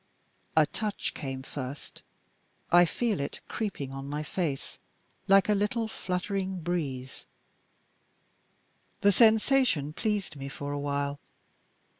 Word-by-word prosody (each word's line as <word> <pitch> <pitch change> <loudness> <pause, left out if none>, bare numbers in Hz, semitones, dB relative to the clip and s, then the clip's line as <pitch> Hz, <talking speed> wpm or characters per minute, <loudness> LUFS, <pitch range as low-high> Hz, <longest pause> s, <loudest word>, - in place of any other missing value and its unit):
A 155 - +7
touch 210 +5 -3
came 135 -3 -5
first. 135 0 -7 0.7
I 175 0 +8
feel 220 +4 0
it 140 - -3
creeping 185 - -3
on 135 +1 -6
my 150 +1 -2
face 155 -4 -3 0.5
like 195 0 +6
a 210 - +4
little 215 +3 0
fluttering 190 -1 -2
breeze. 140 -7 -3 1.7
The 200 - +6
sensation 220 - +4
pleased 210 -2 -1
me 135 0 -5
for 145 +1 -5
a 145 - -2
while. 140 0 -1
175 Hz, 115 wpm, -29 LUFS, 140-205 Hz, 1.7 s, I